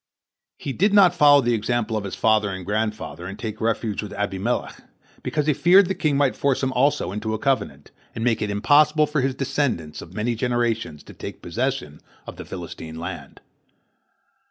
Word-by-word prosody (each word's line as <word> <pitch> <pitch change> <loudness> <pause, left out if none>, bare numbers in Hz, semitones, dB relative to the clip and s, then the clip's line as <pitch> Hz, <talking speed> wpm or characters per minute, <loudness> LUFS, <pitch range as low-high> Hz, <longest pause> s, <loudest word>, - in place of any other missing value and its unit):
He 135 - -5
did 200 +7 +2
not 190 -4 +7
follow 145 -4 +6
the 120 -1 +1
example 115 0 -1
of 105 -2 -2
his 95 - -5
father 110 -2 +2
and 95 -2 -6
grandfather 105 -3 -3
and 100 +2 -7
take 110 -2 -6
refuge 110 -2 -1
with 105 - -7
Abimelech, 105 +3 -2 0.4
because 150 -2 -1
he 150 - +3
feared 185 +7 +6
the 190 - 0
king 150 -6 0
might 140 -2 +2
force 140 -1 0
also 130 -5 +1
him 100 - -5
into 110 +1 -2
a - - -2
covenant, 110 - -2 0.2
and 115 - -3
make 115 -2 +1
it 105 - -1
impossible 145 +9 +4
for 150 -1 -1
his 130 0 -1
descendants 130 - -2
of 85 +2 -12
many 115 +3 0
generations 115 - -1
to - - -13
take - - -9
possession 120 - -3 0.2
of - - -9
the - - -8
Philistine 80 0 -8
land. 85 - -7
115 Hz, 185 wpm, -23 LUFS, 105-140 Hz, 0.4 s, not